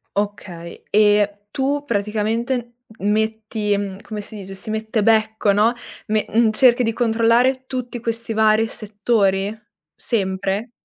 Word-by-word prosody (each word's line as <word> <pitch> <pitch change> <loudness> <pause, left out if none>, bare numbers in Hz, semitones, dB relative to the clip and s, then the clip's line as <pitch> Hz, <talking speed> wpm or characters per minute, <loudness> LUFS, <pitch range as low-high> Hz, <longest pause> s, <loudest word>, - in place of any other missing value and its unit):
Okay, 190 -4 -5
e 205 -1 +3
tu 280 +3 -1
praticamente 230 +2 -1 0.3
metti, 215 0 0
mhmm, 200 -1 -5
come 215 -1 -7
si 205 +1 -8
dice, 195 -2 -8
"si 205 +3 -7
mette 220 0 -1
becco", 220 -1 +2
no? 215 +4 +3 0.3
Me 215 -1 0 0.3
cerchi 250 +1 +5
di 225 - +1
controllare 235 +3 +2
tutti 250 -2 -5
questi 230 0 -1
vari 220 0 +3
settori? 205 -1 0 0.4
Sempre? 195 +1 -2
220 Hz, 120 wpm, -20 LUFS, 205-230 Hz, 0.4 s, cerchi